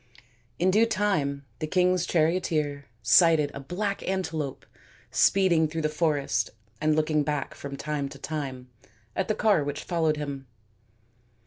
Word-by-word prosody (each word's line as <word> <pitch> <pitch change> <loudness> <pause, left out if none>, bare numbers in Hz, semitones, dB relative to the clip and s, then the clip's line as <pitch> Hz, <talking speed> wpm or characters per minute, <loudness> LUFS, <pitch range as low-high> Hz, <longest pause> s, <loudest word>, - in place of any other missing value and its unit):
In 185 +2 +3
due 220 +4 +4
time 155 -11 0
the 155 - -2
king's 180 +1 +2
charioteer 155 -4 0 0.2
sighted 150 +4 +5
a - - -6
black 195 +8 -3
antelope 160 -7 -3 0.5
speed 190 -1 +4
ing 160 -1 +3
through 160 +1 -4
the 155 - +2
forest 145 - 0 0.3
and 155 0 +3
looking 155 0 +2
back 145 -1 -2
from 140 -1 -7
time 145 -2 -3
to - - -10
time 135 -5 -5 0.5
at 190 - -1
the 215 - 0
car 205 -8 +3
which 145 0 -4
followed 160 -3 0
him. 140 -2 -5
155 Hz, 145 wpm, -27 LUFS, 140-180 Hz, 0.5 s, sighted